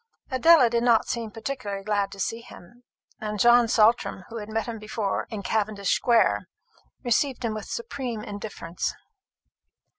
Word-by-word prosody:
Adela 265 +1 +6
did 235 0 0
not 235 -2 +3
seem 230 -2 -3
particularly 215 -3 -5
glad 205 -1 0
to 200 - -10
see 225 +4 -2
him; 240 +1 -15 0.4
and 210 -1 -4
John 240 +2 +6
Saltram, 220 -3 +2
who 230 - -7
had 210 -1 -7
met 220 0 -1
him 230 -2 -6
before 215 -2 -3
in 215 -3 -6
Cavendish 205 -1 -1
square, 235 -2 +2 0.6
received 255 +1 +1
him 225 - -1
with 215 -1 -6
supreme 260 - -5
indifference. 205 -5 -5
225 Hz, 150 wpm, -25 LUFS, 210-240 Hz, 0.6 s, Adela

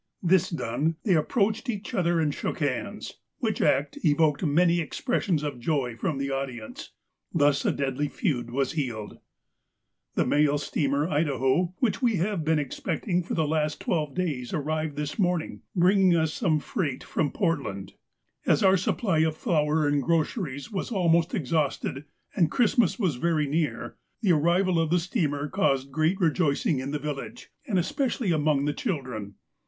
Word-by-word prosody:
This 180 0 +3
done, 150 +2 -1
they 200 - +3
approached 215 - +1
each 210 -3 -4
other, 175 -2 +2
and 150 -2 +1
shook - - -3
hands, 140 -5 -3 0.2
which - - -1
act 140 +2 +1
evoked 150 -1 +3
many 170 +3 +3
expressions 175 - -1
of 145 -4 -4
joy 125 -3 -1
from 135 +5 -2
the 140 0 -2
audience. 130 -5 -5 0.4
Thus 145 -2 +2
a - - +3
deadly 140 +1 -1
feud 140 - -2
was 135 +1 0
healed! 120 -9 -4 1.0
"The - - +2
mail 145 0 +3
steamer 145 0 0
Idaho, 150 +2 +1
which 245 -1 0
we 235 -4 +2
have 190 -1 -1
been 160 +1 +2
expecting 170 +5 -2
for 170 - -4
the 160 -2 +1
last 150 0 0
twelve 150 -5 -1
days, 150 -10 -2
arrived 155 0 -2
this 150 +6 -4
morning, 180 -4 0
bringing 185 0 +4
us 160 -1 +1
some 160 -9 +1
freight 145 -3 -3
from 145 - -1
Portland. 140 - -2 0.5
As - - +3
our 190 0 +6
supply 185 -1 0
of 160 0 +1
flour 155 -2 +1
and 145 -1 +2
groceries 160 - -1
was 195 - -3
almost 170 -2 +2
exhausted, 145 - -1 0.3
and 170 -6 +3
Christmas 235 - +2
was 180 - 0
very 155 +2 +1
near, 150 +1 -2
— - - -48
the 195 - +4
arrival 170 +3 +2
of 165 -1 +1
the 175 - +3
steamer 155 - -1
caused 140 -7 0
great 160 +7 +1
rejoicing 160 -4 +1
in 130 +1 -4
the 150 - -1
village, 150 - -6 0.2
and 200 - +1
especially 230 - 0
among 150 -3 +2
the 145 - 0
children. 125 - -4
155 Hz, 160 wpm, -26 LUFS, 140-180 Hz, 1.0 s, our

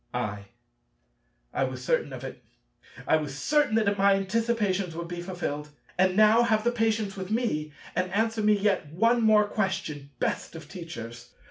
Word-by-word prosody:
I. 100 -1 -3 1.1
I - - +1
was 130 -1 -6
certain - - +1
of - - -7
it. - - -8 0.6
I 160 - +5
was 145 -3 -5
certain 295 - +2
that 205 -2 +2
my 200 0 +5
anticipations 195 -3 0
would 170 0 -5
be 175 0 -5
fulfilled. 175 -5 -4 0.3
And 185 0 +3
now 215 +2 +6
have 220 -1 +2
patience 220 -3 0
with 190 -1 -6
me 210 -10 -1 0.2
and 185 0 0
answer 220 +2 0
me 210 0 +4
yet 195 -6 +1
one 230 +8 +3
more 215 -1 +5
question, 190 -9 -2
best - - -2
of 160 -2 -9
Teachers! 120 - -9
190 Hz, 160 wpm, -27 LUFS, 155-220 Hz, 1.1 s, now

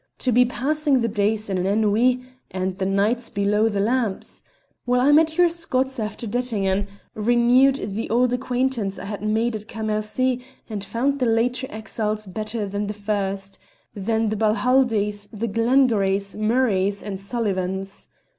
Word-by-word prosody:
To 255 - 0
be 250 +2 +5
passing 280 +2 +1
the 230 - +1
days 215 0 0
in 190 -2 -1
an 180 - 0
ennui 220 +5 +2 0.3
and 185 0 -3
the 190 - 0
nights 215 +5 +1
below 210 +2 +1
the 205 -2 -2
lamps? 225 -1 -1 0.5
Well, 250 0 +3
I 270 +4 +4
met 315 +1 +4
your 355 0 +6
Scots 270 -6 -1
after 215 +2 -4
Dettingen, 205 -4 0 0.3
renewed 240 +4 +4
the 220 -4 -4
old 245 +2 +2
acquaintance 250 -5 -1
I 195 - -7
had 205 0 -5
made 220 +2 0
at 215 0 -7
Cam 220 -1 -5
mercy, 240 +4 0 0.2
and 210 -3 -5
found 270 +7 -1
the 250 - +1
later 245 +3 +1
exiles 215 0 -3
better 215 +3 -4
than 205 +1 -3
the 210 - -4
first 200 -1 -3 0.3
than 220 +2 0
the 215 - -1
Balhaldies, 215 -2 +2
the 220 +1 -3
Glengarries, 220 -4 +2
Mur 225 +5 +2
rays, 200 -2 0
and 195 -2 -5
Sullivans. 195 -2 -3
220 Hz, 160 wpm, -23 LUFS, 200-250 Hz, 0.5 s, your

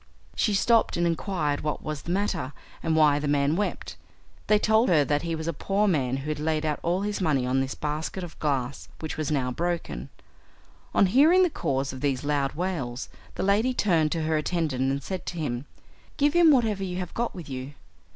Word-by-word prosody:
She 210 - +1
stopped 230 +1 +3
and 175 - +2
inquired 165 -4 -1
what 150 - -3
was 150 -2 -4
the 170 - -5
matter, 180 -8 -1 0.3
and 160 -1 0
why 150 -2 +5
the 145 - -3
man 145 +1 +2
wept. 205 +3 -3 0.5
They 210 - +5
told 220 +2 +3
her 155 -5 +4
that 145 0 +1
he 165 -1 -2
was 160 0 -5
a 170 - 0
poor 200 +7 0
man 135 -8 +1
who 135 +3 -5
had 150 -1 -2
laid 155 0 0
out 150 -1 -1
all 175 +3 0
his 205 -1 -2
money 145 -7 +1
on 130 +1 +1
this 135 0 -3
basket 155 +5 -3
of 170 - -9
glass, 140 -3 -2
which 155 - -4
was 155 -3 -2
now 130 -4 0
broken. 165 - -3 0.9
On - - +6
hearing 300 - +5
the 355 - +2
cause 135 - -1
of 130 - -8
these 140 -2 0
loud 145 -2 0
wails 150 -8 -3 0.3
the - - -2
lady 215 +6 +2
turned 165 -9 +2
to 165 -2 -2
her 155 0 +1
attendant 150 -5 0
and 140 0 -3
said 190 +3 -4
to 175 - -4
him, 140 -4 -3 0.5
"Give 290 0 +3
him 345 -1 +6
whatever 225 -8 +3
you 180 -1 -3
have 180 -2 -5
got 235 0 -2
with 175 -5 -8
you." 130 +1 -6
160 Hz, 210 wpm, -26 LUFS, 140-190 Hz, 0.9 s, On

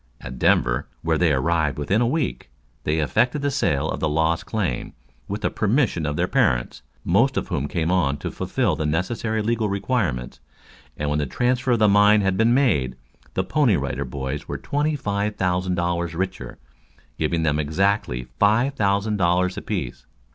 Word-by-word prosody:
At 65 0 -8
Denver, - - +2 0.2
where 80 -1 +1
they 85 -3 +3
arrived 80 +2 +1
within 85 +10 +1
a 120 - +3
week, 125 - -2 0.4
they 75 +1 +1
effected 120 - +1
a 145 - +1
sale 75 - 0
of - - -3
the 80 - 0
Lost 80 +4 0
Claim, 95 - -2 0.3
with 100 +2 -4
the - - 0
permission 105 - +1
of 75 - -2
their - - 0
parents, - - +1 0.2
most 120 +9 +2
of - - -2
whom 70 - -1
came 85 +2 -1
on 75 -7 +1
to - - -5
fulfill - - -1
the 80 - -2
necessary 110 +7 -1
legal 110 -1 0
requirements, 100 - -2 0.6
and 75 -1 -2
when 75 - +1
the 75 - -1
transfer 125 - +1
of - - +2
the 110 -1 +4
mine 105 +1 +5
had 95 -1 +1
been 115 +4 +3
made, 75 - +2 0.4
the - - +1
Pony 140 -10 +2
Rider - - -2
Boys 65 +2 -5
were - - -4
twenty 150 +2 -1
five 105 -5 -2
thousand 90 0 0
dollars 85 -1 -1
richer, 95 +2 -4 0.6
giving 80 +1 0
them 75 -1 +1
exactly 80 - 0 0.2
five 115 +7 +3
thousand 100 -2 0
dollars 90 0 +2
apiece. 65 - -5
90 Hz, 175 wpm, -23 LUFS, 75-110 Hz, 0.6 s, mine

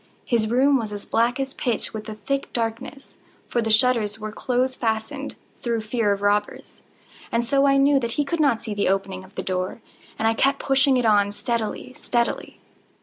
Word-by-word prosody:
His 230 -4 +1
room 270 +4 +4
was 220 -3 -4
as 205 -1 -7
black 240 +3 +1
as 270 0 -2
pitch 240 -4 -1
with 215 -1 -6
the 215 -1 -6
thick 275 +6 -3
darkness, 240 +4 -4 0.3
(for 240 - 0
the 225 - -2
shutters 220 -2 +3
were 215 0 -6
close 255 +3 0
fastened, 220 -3 -3 0.3
through 235 -2 -1
fear 215 -1 0
of 200 0 -2
robbers,) 205 +1 -1 0.5
and 235 +1 +1
so 275 +3 +3
I 275 0 +4
knew 275 0 +4
that 235 -2 -3
he 295 - 0
could 330 +4 -2
not 270 -7 +2
see 220 -2 -4
the 205 -2 +1
opening 195 - -1
of 95 - -17
the - - -3
door, 185 +3 -2 0.4
and 220 - +1
I 225 - +3
kept 275 +4 +2
pushing 270 -1 +3
it 245 - +1
on 205 -2 +4
steadily, 230 +2 -3
steadily. 240 -4 -2
230 Hz, 200 wpm, -23 LUFS, 215-265 Hz, 0.5 s, room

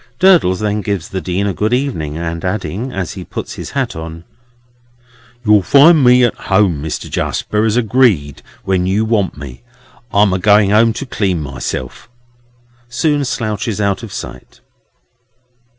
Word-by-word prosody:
Durdles 175 - +4
then 105 0 -1
gives 100 -6 -3
the 95 - -4
Dean 95 +3 -2
a 100 - -1
good 105 +6 -1
evening, 100 - -2
and 85 0 -4
adding, 95 +5 -3
as 95 -7 -4
he 95 -2 -8
puts - - -6
his - - -7
hat - - -1
on, 80 +1 -8 1.2
"You'll 105 -1 +5
find 145 - +5
me 125 0 +5
at 120 - +2
home, 95 -6 +1
Mister 80 0 -5
Jarsper, 105 0 -2
as 110 +2 0
agreed, 110 - +1 0.2
when 90 -1 0
you 105 +4 +1
want 105 -8 0
me; 65 -4 -9 0.5
I'm 100 -1 +3
a 95 - 0
going 105 0 +4
home 115 +2 +4
to 140 - -5
clean 95 -8 -1
myself," 70 - -6 0.8
soon 145 +4 0
slouches 110 -3 -3
out 100 0 0
of 115 -4 -9
sight. - - -9
100 Hz, 155 wpm, -16 LUFS, 90-115 Hz, 1.2 s, You'll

